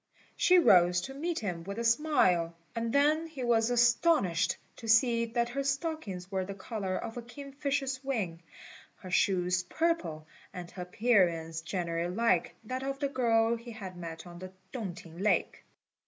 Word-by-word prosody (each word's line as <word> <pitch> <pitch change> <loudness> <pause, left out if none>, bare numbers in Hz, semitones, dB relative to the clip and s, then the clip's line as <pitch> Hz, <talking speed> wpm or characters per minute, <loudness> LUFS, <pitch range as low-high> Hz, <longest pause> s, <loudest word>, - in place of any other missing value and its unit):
She 365 - +5
rose 180 - +6
to 270 - -7
meet 325 +4 -3
him 180 -5 -3
with 200 +3 -6
a 235 - -2
smile, 230 - +2 0.2
and 230 0 -2
then 300 +4 +3
he 290 -5 -7
was 230 -1 +3
astonished 240 - +3 0.2
to 230 - -9
see 230 +1 +4
that 235 +1 -1
her 275 +3 -2
stockings 275 - -3
were 190 -1 0
the 195 +1 -6
colour 195 -2 -4
of 225 - -6
a - - -3
kingfisher's 275 +1 -4
wing, 200 -11 -2 0.5
her 185 - -11
shoes 180 -1 +2
purple, 180 - -1 0.3
and 180 -1 -7
her 185 - -8
appearance 180 -5 +1
generally 170 0 -2
like 230 -6 +1
that 255 +4 -4
of 275 0 -3
the 280 0 -1
girl 230 -3 +2
he 235 +1 -10
had 200 -5 -8
met 165 -1 -7
on 175 -1 -10
the 185 0 -8 0.2
Tung 210 -9 -4
t'ing 165 0 -12
lake. 205 +2 0
225 Hz, 170 wpm, -30 LUFS, 180-265 Hz, 0.5 s, rose